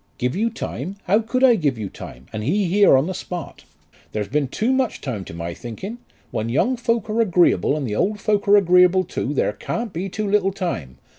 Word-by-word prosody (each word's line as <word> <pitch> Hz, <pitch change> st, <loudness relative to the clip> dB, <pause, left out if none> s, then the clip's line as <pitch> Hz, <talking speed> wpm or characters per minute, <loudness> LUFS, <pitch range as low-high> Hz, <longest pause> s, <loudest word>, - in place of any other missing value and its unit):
"Give 125 Hz, +1 st, -1 dB
you 225 Hz, +4 st, +1 dB
time! 190 Hz, -, -5 dB
How 205 Hz, +4 st, +3 dB
could 245 Hz, +3 st, -1 dB
I 255 Hz, -2 st, +7 dB
give 150 Hz, -, 0 dB
you 105 Hz, -2 st, -4 dB
time, 65 Hz, -7 st, -10 dB
and 110 Hz, -1 st, -4 dB
he 190 Hz, -, +1 dB
here 195 Hz, -4 st, +5 dB
on 135 Hz, -, +2 dB
the 190 Hz, -, -3 dB
spot? 180 Hz, -1 st, -7 dB, 0.5 s
There's 105 Hz, -2 st, -2 dB
been 145 Hz, 0 st, 0 dB
too 225 Hz, -, 0 dB
much 260 Hz, -4 st, 0 dB
time 115 Hz, -8 st, -4 dB
to -, -, -9 dB
my 85 Hz, 0 st, -4 dB
thinking. 185 Hz, -, -7 dB, 0.3 s
When 110 Hz, +1 st, -2 dB
young 240 Hz, -, +2 dB
folk 230 Hz, -2 st, -1 dB
are 220 Hz, +2 st, +1 dB
agreeable 175 Hz, -7 st, +3 dB
and 145 Hz, -, -3 dB
the 105 Hz, -3 st, -3 dB
old 210 Hz, -, 0 dB
folk 205 Hz, 0 st, 0 dB
are 205 Hz, +1 st, +7 dB
agreeable 180 Hz, -1 st, +5 dB
too, 165 Hz, -5 st, -3 dB
there -, -, +1 dB
can't 230 Hz, -4 st, -4 dB
be 185 Hz, +4 st, -3 dB
too 210 Hz, +3 st, -3 dB
little 195 Hz, -1 st, +2 dB
time. 125 Hz, -, -4 dB
185 Hz, 220 wpm, -22 LUFS, 130-215 Hz, 0.5 s, I